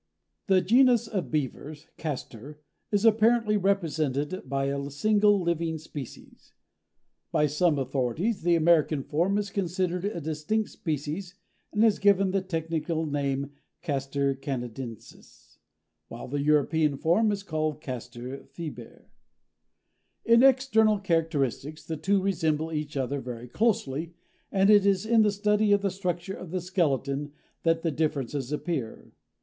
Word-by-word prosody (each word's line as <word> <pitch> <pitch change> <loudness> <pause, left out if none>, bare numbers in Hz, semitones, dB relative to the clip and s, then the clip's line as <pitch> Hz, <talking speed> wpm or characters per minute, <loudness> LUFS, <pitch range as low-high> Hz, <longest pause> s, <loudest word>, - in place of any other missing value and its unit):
The 190 -2 +4
genus 240 +3 +4
of 200 -6 -3
Beavers 150 0 -4
(Castor) 145 -1 -6 0.3
is 205 +1 +1
apparently 225 0 +4
represented 165 -5 0
by 135 0 0
a 140 0 -2
single 205 +7 +3
living 170 -2 -1
species. 150 -4 -10 0.8
By 150 - +3
some 150 +2 +2
authorities 135 - -1
the 170 +1 +3
American 160 -3 +3
form 175 +9 0
is 205 -1 -2
considered 180 -2 -1
a 205 -4 -2
distinct 160 +8 -2
species 160 +4 -4 0.4
and 210 +2 +3
is 215 -3 +3
given 195 -1 +4
the 195 0 +1
technical 165 -2 -2
name 140 -1 -2 0.3
Castor 140 -2 -1
canadensis, 125 - -8 0.5
while - - -8
the 140 +2 -2
European 150 0 +2
form 195 +9 +2
is 200 -1 -3
called 155 -4 -2
Castor 125 -1 -7
fiber. 140 -5 -9 1.2
In 230 +1 +6
external 255 -5 +4
characteristics 155 - -1
the 160 - -3
two 195 +6 +1
resemble 160 -4 0
each 150 -2 -3
other 135 +1 -2
very 125 -1 -7
closely, 165 - -1 0.4
and 195 +1 +4
it 205 -2 +6
is 200 0 +2
in 225 0 +4
the 210 -1 +4
study 210 +1 +2
of 200 0 +3
the 195 - +1
structure 180 0 -3
of 185 - -8
the 185 +2 -2
skeleton 145 -5 -1 0.3
that 165 0 +1
the 165 - +1
differences 145 -3 -2
appear. 150 -6 -4
160 Hz, 135 wpm, -27 LUFS, 140-195 Hz, 1.2 s, In